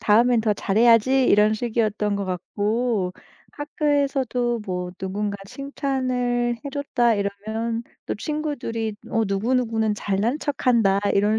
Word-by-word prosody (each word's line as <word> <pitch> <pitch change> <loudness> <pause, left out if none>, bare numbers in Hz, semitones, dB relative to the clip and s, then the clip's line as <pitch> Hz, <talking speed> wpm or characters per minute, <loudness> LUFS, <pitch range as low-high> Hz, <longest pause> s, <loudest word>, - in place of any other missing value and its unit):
"다음엔 230 +2 +4
더 215 -1 +2
잘해야지." 230 +6 +4
이런 210 +1 +4
식이었던 215 -3 0
것 200 - -2
같고 205 +2 -1 0.4
학교에서도 275 -5 0
뭐 180 -1 -3
"누군가 200 +2 -3
칭찬을 255 -2 -1
해줬다." 270 -4 +1
이러면 220 +3 -3 0.2
또 - - -2
친구들이 230 -6 -3
어 225 - +1
"누구누구는 220 +1 0
잘난척한다." 225 0 +1
이런 210 +2 +3
230 Hz, 280 characters per minute, -23 LUFS, 205-250 Hz, 0.4 s, 다음엔